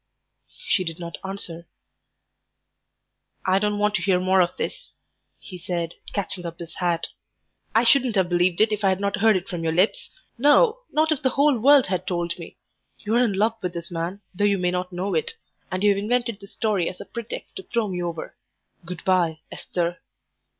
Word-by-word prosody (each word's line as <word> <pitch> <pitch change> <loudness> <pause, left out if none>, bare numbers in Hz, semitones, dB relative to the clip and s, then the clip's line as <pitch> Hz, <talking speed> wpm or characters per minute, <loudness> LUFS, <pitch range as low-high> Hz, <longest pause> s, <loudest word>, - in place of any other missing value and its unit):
She 185 - +3
did 165 -2 -5
not 170 -1 -7
answer. 175 -3 -6 1.8
"I 190 +1 +3
don't 210 0 0
want 210 0 +2
to - - -5
hear 180 0 +3
more 185 +1 +4
of 175 - 0
this," - - -5 0.4
he 180 -2 -10
said, 170 -1 -3 0.2
catching 190 -3 -3
up 170 -1 -6
his 170 -1 -9
hat. 175 -2 0 0.7
"I 225 - +5
shouldn't 245 -1 +4
have 190 -2 +3
believed 175 +1 +2
it 215 0 +4
if 210 0 -2
I 195 - +5
had 190 0 +1
not 200 +1 0
heard 215 -1 +5
it 185 +1 -6
from 175 -3 -4
your 160 -1 0
lips; 200 - +2 0.3
no, 435 - +5
not 315 +1 +2
if 300 - 0
the 260 - +2
whole 280 +2 +3
world 280 +2 +6
had 185 0 -2
told 175 -1 -2
me. 170 - -10 0.4
You 210 - -3
are 235 - +4
in 225 -5 +1
love 220 +4 +1
with 180 -1 -3
this 170 0 -6
man, 175 +4 -3
though 195 +3 -2
you 200 -1 +4
may 180 -1 +1
not 180 0 -2
know 185 +2 -2
it, 160 - -1 0.4
and 185 +1 -2
you've 205 -1 +4
invented 235 0 0
this 200 -1 -12
story 205 -6 0
as 185 - -10
a - - -7
pretext 235 -1 -7
to - - -4
throw 230 -3 +1
me 180 -2 -3
over. 170 -2 -5 0.5
Good 175 0 -7
bye, 170 -4 +2
Esther." 175 0 -3
190 Hz, 200 wpm, -24 LUFS, 175-215 Hz, 1.8 s, world